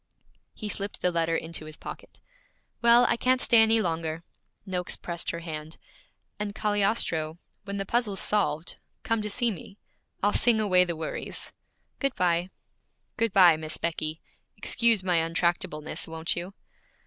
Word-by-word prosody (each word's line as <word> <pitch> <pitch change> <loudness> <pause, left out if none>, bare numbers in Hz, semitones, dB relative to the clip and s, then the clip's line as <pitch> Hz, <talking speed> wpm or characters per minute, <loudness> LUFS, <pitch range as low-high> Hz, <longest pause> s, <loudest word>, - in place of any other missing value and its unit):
He 215 - -6
slipped 200 0 -4
the 180 - +3
letter 165 -1 0
into 160 -1 -4
his 155 +1 -10
pocket. - - -10 0.6
'Well, 235 +1 +6
I - - +2
can't 255 +2 +2
stay 235 -2 +5
any 225 0 +4
longer.' 165 -1 -2 0.4
Noakes 180 -2 -1
pressed 170 -1 -3
her 170 - -4
hand. 155 -1 -7 0.6
'And, 205 0 -4
Cagliostro, 200 -7 0 0.3
when 200 0 -4
the 195 - -2
puzzle's 215 -2 0
solved, 185 -6 0 0.3
come 225 -1 0
to 210 - -3
see 240 +2 +2
me. 195 +1 -10 0.5
I'll 205 - +3
sing 235 -3 +6
away 185 -4 +4
the 170 -1 -3
worries, 160 0 -4 0.5
Good 275 -2 0
bye.' 180 -1 +1 0.7
'Good 230 -2 0
bye, 180 -4 +6
Miss 155 0 -3
Becky. 160 -1 -3 0.4
Excuse 230 -4 +3
my 180 -2 +2
untractableness, 165 -2 -1
won't 160 0 -2
you?' 180 +3 -6
180 Hz, 150 wpm, -27 LUFS, 165-210 Hz, 0.7 s, Well